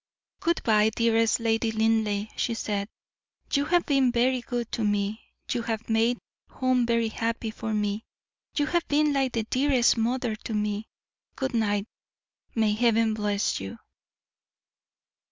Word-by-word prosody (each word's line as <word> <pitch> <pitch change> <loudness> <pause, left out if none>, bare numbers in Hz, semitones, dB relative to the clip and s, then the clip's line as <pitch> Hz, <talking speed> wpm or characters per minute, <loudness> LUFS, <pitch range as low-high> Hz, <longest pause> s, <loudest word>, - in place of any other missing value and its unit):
"Good 340 0 0
bye, 215 -1 +4
dearest 230 +1 +2
Lady 225 0 +1
Linleigh," 220 -1 +1
she 230 - -1
said; 205 -3 -2 0.7
"you 280 0 +3
have 350 +2 +2
been 270 -3 +3
very 250 +1 +2
good 240 -1 -4
to 230 - -2
me; 205 +1 0 0.3
you 240 - 0
have 225 -1 -3
made 230 +2 +3 0.3
home 255 -2 +1
very 230 -1 +2
happy 225 0 -2
for 225 0 -5
me; 210 0 -1 0.5
you 290 - +3
have 345 +2 0
been 295 0 +2
like 270 -2 +1
the 230 - 0
dearest 255 +1 +3
mother 235 0 0
to 220 - -5
me. 210 +1 -1 0.5
Good 265 -1 -2
night; 205 -3 +1 0.7
may 220 -2 +2
Heaven 225 0 +3
bless 205 -1 0
you!" 95 0 -7
225 Hz, 145 wpm, -27 LUFS, 215-245 Hz, 0.7 s, bye